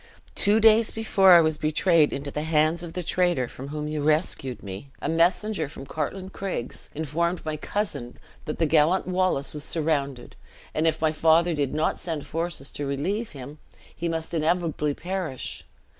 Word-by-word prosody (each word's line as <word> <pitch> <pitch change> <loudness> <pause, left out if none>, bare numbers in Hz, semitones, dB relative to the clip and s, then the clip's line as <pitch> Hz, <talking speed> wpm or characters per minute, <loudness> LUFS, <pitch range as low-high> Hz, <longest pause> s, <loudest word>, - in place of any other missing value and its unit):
Two 210 +2 +4
days 225 0 +6
before 195 -4 +4
I 170 - +9
was 155 -1 +1
betrayed 155 +1 +3
into 140 +1 -4
the 150 - -3
hands 155 +1 +2
of 170 -2 -7
the 180 - -3
traitor 175 -7 +1
from 130 +3 -9
whom 150 +1 -4
you 150 0 -2
rescued 150 -4 0
me, 100 +7 -8
a - - -3
messenger 170 +1 +1
from 140 -2 -9
Cartlane 185 +7 -4
Craigs 190 -12 -5
informed 160 +4 -1
my 155 -1 -2
cousin 155 - -4 0.3
that 150 - -4
the 165 - +2
gallant 160 +4 +3
Wallace 185 -6 0
was 150 -1 -5
surrounded; 140 -6 -2 0.4
and 160 +1 +1
if 160 -1 +1
my 160 -1 +3
father 165 +2 +3
did 145 -2 -1
not 155 +1 0
send 160 -4 -4
forces 165 -4 -3
to 145 - -4
relieve 185 +12 -2
him, 140 +2 -9 0.4
he 170 +1 -2
must 165 0 -3
inevitably 160 -2 0
perish. 175 -7 -4
160 Hz, 175 wpm, -25 LUFS, 150-175 Hz, 0.4 s, I